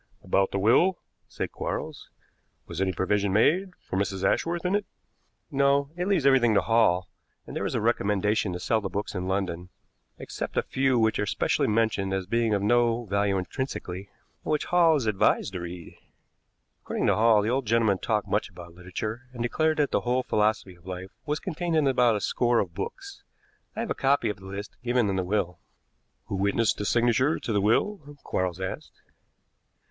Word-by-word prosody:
"About 95 Hz, 0 st, +2 dB
the -, -, -2 dB
will," 130 Hz, -, +4 dB, 0.3 s
said -, -, -5 dB
Quarles. -, -, -5 dB, 0.6 s
"Was 85 Hz, +2 st, -5 dB
any 95 Hz, -1 st, +1 dB
provision 100 Hz, +1 st, 0 dB
made 175 Hz, -, +2 dB
for 95 Hz, -, -2 dB
Mrs. 95 Hz, -1 st, -2 dB
Ashworth 170 Hz, -, 0 dB
in 180 Hz, -, +1 dB
it?" 205 Hz, 0 st, +1 dB, 0.7 s
"No; 140 Hz, 0 st, +2 dB
it 180 Hz, +1 st, -2 dB
leaves 185 Hz, -8 st, +1 dB
everything 125 Hz, -5 st, +5 dB
to -, -, +5 dB
Hall, 100 Hz, -6 st, +2 dB, 0.4 s
and -, -, -9 dB
there -, -, -1 dB
is -, -, -3 dB
a -, -, 0 dB
recommendation 105 Hz, 0 st, +1 dB
to 90 Hz, -, -4 dB
sell 110 Hz, +2 st, +1 dB
the 95 Hz, -, -3 dB
books 100 Hz, +2 st, -4 dB
in 90 Hz, -2 st, -3 dB
London, 90 Hz, -2 st, -2 dB, 0.5 s
except -, -, -6 dB
a -, -, +3 dB
few 130 Hz, -1 st, +1 dB
which 110 Hz, -1 st, +2 dB
are 105 Hz, -, 0 dB
specially -, -, +1 dB
mentioned 105 Hz, -3 st, +1 dB
as 95 Hz, -1 st, -3 dB
being 115 Hz, +3 st, +1 dB
of 100 Hz, -, -1 dB
no 120 Hz, +1 st, +2 dB
value 100 Hz, -1 st, +1 dB
intrinsically, 95 Hz, -2 st, -5 dB, 0.3 s
and -, -, -3 dB
which 150 Hz, -, 0 dB
Hall 170 Hz, -2 st, +4 dB
is 135 Hz, -6 st, -1 dB
advised 105 Hz, -1 st, +1 dB
to 90 Hz, -, -3 dB
read. 85 Hz, -1 st, -8 dB, 0.9 s
According -, -, -2 dB
to -, -, +4 dB
Hall, 110 Hz, -1 st, +4 dB
the 110 Hz, -, 0 dB
old 130 Hz, -2 st, -1 dB
gentleman 110 Hz, -4 st, +2 dB
talked 105 Hz, -2 st, -1 dB
much -, -, 0 dB
about 85 Hz, -1 st, -12 dB
literature, 105 Hz, +7 st, -6 dB
and 120 Hz, -2 st, -4 dB
declared 155 Hz, +6 st, +1 dB
that 145 Hz, -2 st, +1 dB
the -, -, +1 dB
whole 125 Hz, +1 st, 0 dB
philosophy 105 Hz, -4 st, 0 dB
of 90 Hz, +1 st, -20 dB
life 95 Hz, +1 st, -6 dB, 0.2 s
was 150 Hz, +1 st, -1 dB
contained 175 Hz, -1 st, -3 dB
in 155 Hz, -2 st, +3 dB
about 125 Hz, -4 st, +3 dB
a 105 Hz, -, -2 dB
score 120 Hz, +3 st, +1 dB
of 90 Hz, -6 st, 0 dB
books. 395 Hz, -, -7 dB, 0.5 s
I -, -, -2 dB
have 230 Hz, -, -3 dB
a -, -, +3 dB
copy 140 Hz, -2 st, +1 dB
of 105 Hz, -, -4 dB
the 95 Hz, 0 st, -12 dB
list 100 Hz, +2 st, -7 dB
given 120 Hz, -3 st, +1 dB
in -, -, -1 dB
the 95 Hz, -, 0 dB
will." 90 Hz, -2 st, -1 dB, 0.7 s
"Who 100 Hz, -, -4 dB
witnessed 100 Hz, +3 st, +1 dB
the 105 Hz, -, -2 dB
signature 120 Hz, +6 st, +2 dB
to 115 Hz, -, -4 dB
the 100 Hz, -, +2 dB
will?" 145 Hz, -, 0 dB
Quarles 90 Hz, -1 st, -2 dB
asked. 95 Hz, 0 st, -6 dB
110 Hz, 195 wpm, -26 LUFS, 95-130 Hz, 0.9 s, everything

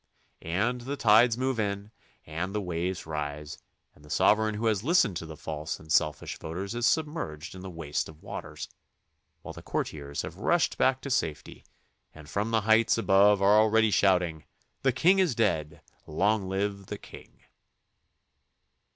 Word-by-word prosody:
And 105 Hz, +9 st, -1 dB
the 140 Hz, +4 st, -5 dB
tides 115 Hz, 0 st, +5 dB
move 130 Hz, -2 st, -1 dB
on 100 Hz, 0 st, -3 dB, 0.3 s
and 85 Hz, +6 st, -4 dB
the -, -, +1 dB
waves 90 Hz, -1 st, -3 dB
rise 75 Hz, -1 st, -5 dB, 0.3 s
and 75 Hz, -, -21 dB
the 75 Hz, -, -16 dB
sovereign 110 Hz, +6 st, +3 dB
who 110 Hz, +2 st, -3 dB
has 110 Hz, -3 st, +1 dB
listened 135 Hz, -, +3 dB
to 80 Hz, -, -7 dB
the 80 Hz, -1 st, -9 dB
false 75 Hz, 0 st, -5 dB
and 80 Hz, 0 st, -11 dB
selfish 75 Hz, -3 st, 0 dB
voices 95 Hz, +6 st, -5 dB
is 120 Hz, 0 st, +1 dB
submerged 150 Hz, -, -2 dB
in 95 Hz, -, -10 dB
the 95 Hz, -, -7 dB
waste 80 Hz, -5 st, -3 dB
of 80 Hz, 0 st, -15 dB
waters, -, -, -7 dB, 0.8 s
while -, -, -8 dB
the -, -, -10 dB
courtiers 70 Hz, -1 st, -4 dB
have -, -, -8 dB
rushed -, -, +1 dB
back 130 Hz, 0 st, +2 dB
to 140 Hz, -, -5 dB
safety 75 Hz, -, -2 dB, 0.5 s
and 75 Hz, -2 st, -12 dB
from 100 Hz, +7 st, -2 dB
the 115 Hz, -1 st, +2 dB
heights 110 Hz, +2 st, +3 dB
above 100 Hz, -2 st, +4 dB
are 105 Hz, +2 st, +6 dB
already 110 Hz, 0 st, +3 dB
shouting, 90 Hz, -5 st, +2 dB, 0.4 s
"The 135 Hz, -, +3 dB
king 175 Hz, +10 st, +3 dB
is 175 Hz, -10 st, +2 dB
dead! 75 Hz, -9 st, -1 dB, 0.3 s
Long 100 Hz, -1 st, +1 dB
live 100 Hz, 0 st, -2 dB
the -, -, -5 dB
king -, -, -15 dB
100 Hz, 165 wpm, -28 LUFS, 80-115 Hz, 0.8 s, are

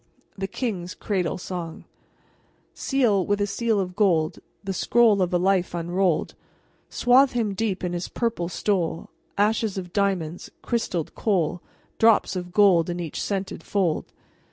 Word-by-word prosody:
THE 195 Hz, -1 st, -3 dB
KING'S 190 Hz, -5 st, -4 dB
CRADLE 185 Hz, -6 st, -1 dB
SONG 175 Hz, -3 st, -6 dB, 0.9 s
Seal 235 Hz, -9 st, +1 dB
with 205 Hz, +3 st, 0 dB
a 205 Hz, -, +2 dB
seal 225 Hz, +1 st, 0 dB
of 180 Hz, -2 st, -3 dB
gold 170 Hz, -7 st, +2 dB, 0.2 s
The 195 Hz, -1 st, -3 dB
scroll 215 Hz, +1 st, +3 dB
of 180 Hz, 0 st, +1 dB
a 180 Hz, -, +3 dB
life 185 Hz, -1 st, +1 dB
unrolled; 175 Hz, 0 st, 0 dB, 0.6 s
Swathe 255 Hz, +2 st, +4 dB
him 225 Hz, -4 st, 0 dB
deep 195 Hz, -2 st, -2 dB
in 180 Hz, -1 st, -2 dB
his 175 Hz, 0 st, -3 dB
purple 225 Hz, -8 st, -2 dB
stole; 170 Hz, -4 st, -1 dB, 0.3 s
Ashes 210 Hz, 0 st, +1 dB
of 180 Hz, -2 st, -6 dB
diamonds, 185 Hz, -5 st, -1 dB
crystalled 185 Hz, -9 st, -2 dB
coal, 175 Hz, -5 st, 0 dB, 0.4 s
Drops 225 Hz, -3 st, +4 dB
of 180 Hz, -1 st, -5 dB
gold 180 Hz, -4 st, +4 dB
in 175 Hz, 0 st, -3 dB
each 165 Hz, -3 st, -4 dB
scented 195 Hz, -4 st, -3 dB
fold. 180 Hz, -4 st, -1 dB
190 Hz, 145 wpm, -24 LUFS, 175-210 Hz, 0.9 s, Swathe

